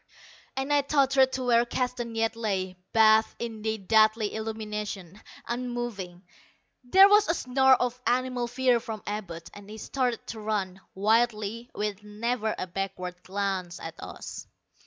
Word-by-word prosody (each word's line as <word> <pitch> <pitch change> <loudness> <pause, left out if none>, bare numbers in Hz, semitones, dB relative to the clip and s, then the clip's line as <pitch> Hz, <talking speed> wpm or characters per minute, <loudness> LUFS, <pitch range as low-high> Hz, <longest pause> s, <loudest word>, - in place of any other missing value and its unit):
and 270 +2 0
I 290 - +5
tottered 275 -2 +3
to 260 - -2
where 235 -1 +4
Keston 240 -1 -3
yet 225 0 0
lay, 190 -5 -2 0.2
bathed 220 0 +5
in 225 -2 -5
the 220 0 -1
deadly 215 +1 +3
illumination, 210 -3 -5 0.3
unmoving. 240 -7 -4 0.6
There 380 +10 +7
was 415 +1 +5
a 335 - +3
snarl 265 -1 +4
of 250 0 -2
animal 250 -1 +1
fear 250 0 +2
from 220 -2 -7
Abud, 185 -6 -5
and 205 0 -12
he 215 - -8
started 250 0 -2
to 225 - -6
run, 200 -3 -2
wildly, 220 +2 +1
with 210 -1 -3
never 220 +2 -2
a - - -3
backward 180 -1 -5
glance 190 -3 -3
at 165 - -7
us. - - -8
220 Hz, 145 wpm, -27 LUFS, 205-245 Hz, 0.6 s, There